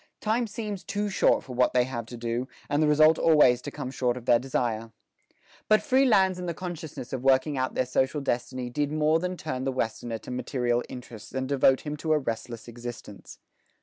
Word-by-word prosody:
Time 225 +2 0
seems 210 -2 -5
too 205 0 -2
short 190 - +3
for 130 - -9
what 125 +1 +3
they 125 -1 +4
have 120 -3 -5
to 120 - -8
do, 120 +2 -2 0.2
and 145 +1 +2
the 155 - +4
result 155 +2 +5
always 150 -7 +5
to - - -5
come 135 -3 -6
short 125 -2 0
of 120 - -9
their 120 - +5
desire." 115 -3 -2 0.8
But 215 0 +5
free 270 -2 +3
lands 190 -5 +3
and 180 -1 -4
the 170 - -3
consciousness 160 -8 -7
of 130 - -2
working 135 +2 +3
out 130 -1 -2
their 130 - +1
social 130 +3 0
destiny 125 -1 -3
did 145 +3 -1
more 155 +1 +2
than 180 +1 -3
turn 130 -6 -4
the 135 - 0
Westerner 115 -2 -3
to 110 - -10
material 125 -1 0
interests 120 -3 -10
and 130 0 -2
devote 135 -1 +3
him 150 -1 -4
to 155 +1 0
a - - +4
restless 115 -3 -5
existence. 120 -4 -9
130 Hz, 210 wpm, -27 LUFS, 120-160 Hz, 0.8 s, result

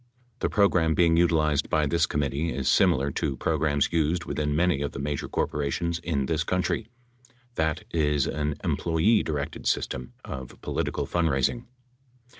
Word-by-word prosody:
The - - 0
program 90 -6 +3
being 85 -2 +4
utilized 80 -4 +2
by 75 -2 +2
this 85 +2 +2
committee 75 +3 -1
is 65 -2 -3
similar 70 +1 +3
to 70 -1 -2
programs 75 0 0
used 80 +1 +1
within 75 -1 -1
many 85 -3 +2
of 70 - -3
the - - -6
major 70 0 -3
corporations 80 +4 -1
in 80 -5 -1
this 80 +2 0
country, 90 +5 -1 0.7
that 80 -7 -1
is 75 -4 +1
an 75 0 -2
employee 85 +7 +2
directed 75 -3 -4
system 65 -2 -1
of 65 -2 -8
political - - -2
fundraising. 85 - 0
75 Hz, 145 wpm, -26 LUFS, 70-85 Hz, 0.7 s, being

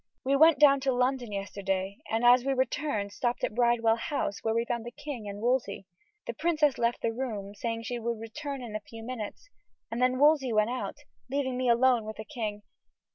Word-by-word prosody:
We 275 +1 +2
went 315 +1 +6
down 280 -2 +6
to 265 0 0
London 250 -2 0
yesterday, 195 -1 -3
and 225 +2 0
as 245 0 +7
we 275 +1 +1
returned 260 -5 -1
stopped 240 +2 -2
at - - 0
Bridewell 235 -1 +3
House, 230 -4 -2
where 225 - +1
we 230 0 +1
found 235 -1 -2
the 240 - -6
king 260 -5 -7
and 200 0 -7
Wolsey. 240 -5 0 0.4
The 235 - -4
princess 305 -1 +1
left 235 0 0
the 225 - +1
room, 215 -5 -4
saying 230 +2 -3
she 240 +1 -3
would 230 -1 -3
return 260 +4 -6
in 220 -3 -7
a - - -1
few 225 +2 -11
minutes, 250 - -7 0.4
and 235 +2 -3
then 255 0 +3
Wolsey 290 -2 +4
went 215 +1 +2
out, 255 - -4 0.3
leaving 265 -1 -1
me 255 0 0
alone 240 0 +4
with 215 0 -7
the 220 - -7
king. 215 -6 -5
240 Hz, 205 wpm, -29 LUFS, 220-265 Hz, 0.4 s, as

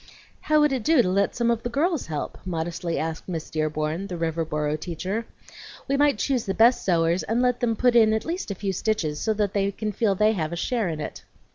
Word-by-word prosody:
"How 305 0 +3
would 295 -1 +4
it 260 -2 0
do 300 +1 +4
to - - -1
let 200 +2 +1
some 235 -1 +2
of 230 -1 -1
the 240 - -3
girls 315 +5 0
help?" 150 -2 -4
modestly 170 -1 -3
asked 160 +3 -4
Miss 165 -3 -5
Dearborn, 155 +3 -2
the 180 -3 -5
Riverboro 160 -2 -1
teacher. 185 +7 -4 0.6
"We 275 - +1
might 285 -3 +3
choose 250 0 -1
the 195 - -1
best 240 +2 +5
sewers 170 0 +2
and 225 +9 -1
let 250 -1 +2
them 230 -2 +1
put 245 +2 +2
in 220 -2 +6
at 220 0 0
least 345 - -3
a 200 - -3
few 195 0 -2
stitches, 180 -7 -1
so 220 -1 0
that 205 -2 0
they 200 -1 +1
can 215 +2 -3
feel 205 -1 +1
they 215 +3 +4
have 165 -7 -2
a - - -3
share 225 +2 -1
in 155 -2 -4
it." 150 - -6
200 Hz, 235 wpm, -25 LUFS, 165-235 Hz, 0.6 s, in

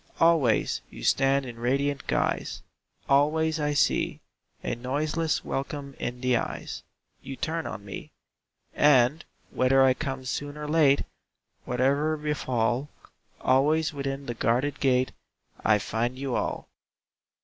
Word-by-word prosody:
Always 165 -9 +3
you - - -11
stand 135 - +3
in 120 -2 -8
radiant 140 +3 0
guise, - - -1 0.4
Always 155 +3 +3
I 150 -1 0
see 135 - +1 0.4
A - - -1
noiseless 150 +6 -1
welcome 140 0 -4
in 125 0 -4
the 125 -1 +3
eyes - - -5 0.4
You 135 - -7
turn 165 +4 -3
on 100 -2 -7
me. 100 - -7 0.6
And, 145 +1 +4 0.3
whether 135 +1 +4
I 130 -1 +5
come 130 0 -4
soon 145 +3 -4
or 150 0 -5
late, 150 -3 +4 0.6
Whate'er 140 +5 +1
befall, 130 -3 -1 0.5
Always 155 +4 +3
within 140 -1 -4
the 120 - -3
guarded 130 +5 0
gate 130 -2 +2 0.5
I 105 -1 +5
find 115 +4 -2
you 135 -1 -3
all. - - -2
135 Hz, 125 wpm, -27 LUFS, 125-150 Hz, 0.6 s, I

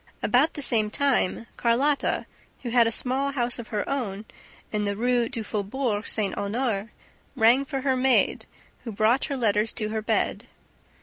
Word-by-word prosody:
About 270 +6 +3
the 290 - -5
same 220 -5 +1
time, 250 -4 +1
Carlotta, 270 +5 +1 0.4
who 240 - -4
had 235 -1 +5
a - - 0
small 265 +4 -1
house 245 -2 -1
of 235 - -7
her 210 -3 -3
own 220 -7 -3 0.5
in 210 -1 -1
the 200 0 -1
Rue 240 +1 +1
du 230 -4 -4
Faubourg 210 +1 -2
St. 205 -3 -1
Honore, 215 0 -2 0.5
rang 235 +5 +5
for 270 -1 -4
her 265 -1 +1
maid, 255 0 +2 0.4
who 230 - -5
brought 220 +5 +2
her 280 -3 -3
letters 215 -2 +2
to 215 -1 -3
her 220 0 -2
bed. 215 - -1
235 Hz, 170 wpm, -25 LUFS, 215-265 Hz, 0.5 s, had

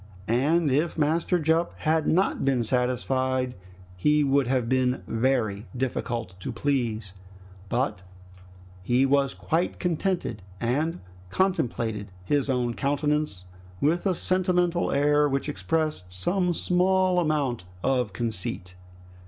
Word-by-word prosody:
And 145 +6 +2
if 155 +6 +1
Master 160 +4 +2
Jup 165 +1 +1
had 160 0 +1
not 185 +4 +2
been 135 -3 +2
satisfied, 130 +1 0 0.4
he 150 +11 +3
would 140 -2 +2
have 125 -2 +1
been 130 0 +1
very 115 -3 0
difficult 120 -5 -2
to 130 - -4
please; 115 -6 -1 0.6
but 120 -6 -1 0.8
he 120 +8 +2
was 135 0 +2
quite 165 +3 -1
contented 175 - -1 0.2
and 150 +8 -1 0.3
contemplated 115 - -1
his 140 +7 0
own 125 -2 0
countenance 145 -7 -1 0.3
with 170 +6 +1
a 185 - +1
sentimental 180 -1 +1
air 145 +1 +3
which 140 +1 -1
expressed 155 - -2
some 175 - 0
small 185 +1 +2
amount 145 - 0 0.2
of 125 -5 +1
conceit. 95 -4 -3
135 Hz, 115 wpm, -26 LUFS, 120-160 Hz, 0.8 s, he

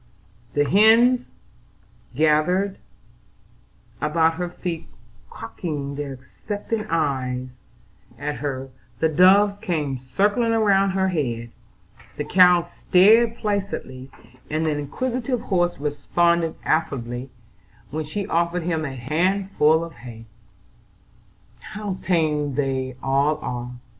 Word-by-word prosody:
The 145 0 +2
hens 230 - +5 0.9
gathered 160 +7 +2 1.2
about 160 +1 +2
her 175 +1 -4
feet 175 -2 -5 0.4
cocking 140 +3 -5
their 140 -1 -5
expectant 205 - -5
eyes 130 -5 -2 0.6
at 145 +3 -4
her; 135 -2 -4 0.3
the 160 +5 +1
doves 195 +5 +5
came 145 -7 -2
circling 205 - +1
round 195 -3 +3
her 190 0 +1
head; 120 -9 -3 0.7
the - - -2
cow 180 -2 +5
stared 220 +7 +4
placidly, 200 - -4 0.4
and 155 +1 -1
the 155 - +1
inquisitive 245 - -2
horse 175 -3 0
responded 165 +3 0
affably 125 -4 -1 0.6
when 155 +2 -3
she 195 +7 -4
offered 170 +1 0
him 160 -2 -1
a 135 -3 -5
handful 160 +3 +1
of 170 0 -8
hay. 120 -2 -11 1.3
"How 210 - -6
tame 150 -6 0
they 130 -2 -2
all 140 +3 +2
are! 125 0 -5
160 Hz, 105 wpm, -23 LUFS, 140-190 Hz, 1.3 s, hens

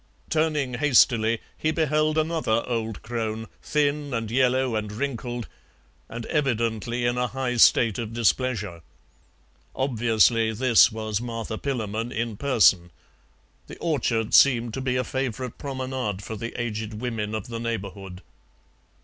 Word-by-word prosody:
Turning 155 -5 +1
hastily, 120 -4 +3 0.2
he 155 - -1
beheld 155 -1 +1
another 155 -8 +1
old 115 -3 -3
crone, 110 -1 -3 0.2
thin 145 -2 0
and 115 -1 -3
yellow 130 -1 +2
and 105 -1 -3
wrinkled, 120 0 -4 0.6
and 115 0 -6
evidently 120 -4 -1
in 120 +1 +1
a 125 - +1
high 125 +1 -2
state 115 -2 +5
of 115 -2 -4
displeasure. 115 -6 0 0.9
Obviously 115 -3 +2
this 120 0 +5
was 110 -1 -3
Martha 115 -2 -4
Pillamon 115 -3 -3
in 115 -1 -3
person. 100 -9 +3 0.8
The - - -10
orchard 120 -9 -1
seemed 120 -4 +5
to 135 - -3
be 130 -1 -1
a 125 - +1
favourite 130 -2 -4
promenade 130 -7 -4
for 110 - -6
the 115 +3 -6
aged 110 -2 -3
women 110 -2 -3
of 110 - -4
the 115 -1 -4
neighbourhood. 100 -5 -5
120 Hz, 130 wpm, -25 LUFS, 110-130 Hz, 0.9 s, state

